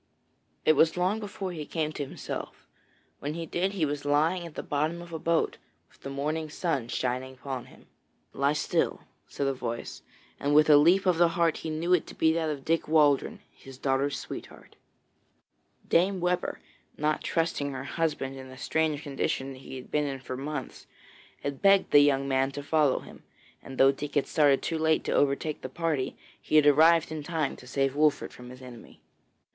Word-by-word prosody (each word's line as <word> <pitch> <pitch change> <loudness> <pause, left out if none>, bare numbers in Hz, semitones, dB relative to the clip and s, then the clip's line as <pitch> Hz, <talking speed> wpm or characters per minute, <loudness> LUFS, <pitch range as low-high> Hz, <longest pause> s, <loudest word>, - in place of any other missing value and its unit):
It 155 - +6
was 160 +3 +3
long 185 +5 +1
before 200 -3 -5
he 160 -3 -5
came 155 0 -2
to 150 - -4
himself. 135 - -7 0.5
When 145 +2 -4
he 165 0 -4
did, 185 +4 -1
he 180 -6 +1
was 145 -1 -3
lying 160 +5 +1
at 160 - -14
the - - -4
bottom 155 +4 -1
of 170 -1 -10
a 160 - -3
boat, 165 +1 0 0.3
with - - -26
the 135 - -6
morning 155 +3 -2
sun 145 -6 -2
shining 130 +2 -2
upon 130 -1 -6
him. - - -18 0.5
'Lie 140 +1 +1
still,' 150 - 0 0.3
said 140 - -3
a 135 - +1
voice, 120 -2 -5 0.4
and 145 +1 +1
with 155 0 +6
a 145 - +9
leap 175 +7 +5
of 180 -3 +2
the 175 - +6
heart 165 -2 +2
he 160 - -5
knew 165 +3 0
it 180 - +2
to - - -10
be 160 0 +3
that 160 -1 0
of 140 -3 -5
Dick 165 +1 +1
Waldron, 155 +7 +3
his 135 -1 -14
daughter's 135 +1 0
sweetheart. - - -9 1.1
Dame 185 +3 +3
Webber, 180 0 -1 0.4
not 150 +1 0
trusting 160 -4 -1
her 130 -1 -5
husband 140 -3 -2
in 130 0 -9
the 130 - -11
strange 155 +2 0
condition 135 -1 -2
he 130 0 -10
had 130 - -10
been 150 0 +1
in 135 -1 -4
for 130 0 -6
months, 140 +1 -6 0.6
had 140 -1 -4
begged 195 -1 +4
the 145 - +8
young 140 -1 +3
man 135 0 +2
to 145 - -6
follow 150 -2 +2
him, - - -13 0.4
and 135 - -10
though 135 0 +6
Dick 145 +1 -7
had 145 - +2
started 145 -3 +3
too 165 - -2
late 160 0 +2
to - - -3
overtake 145 +2 +1
the 130 - -6
party, 155 -2 -2 0.2
he - - -2
had 155 -1 +7
arrived 160 +3 +5
in 155 -1 -4
time 155 -2 -2
to 125 - -14
save 135 +1 0
Wolfert 150 0 +2
from 125 0 -11
his 125 +1 -12
enemy. 125 -2 -12
150 Hz, 195 wpm, -28 LUFS, 135-165 Hz, 1.1 s, a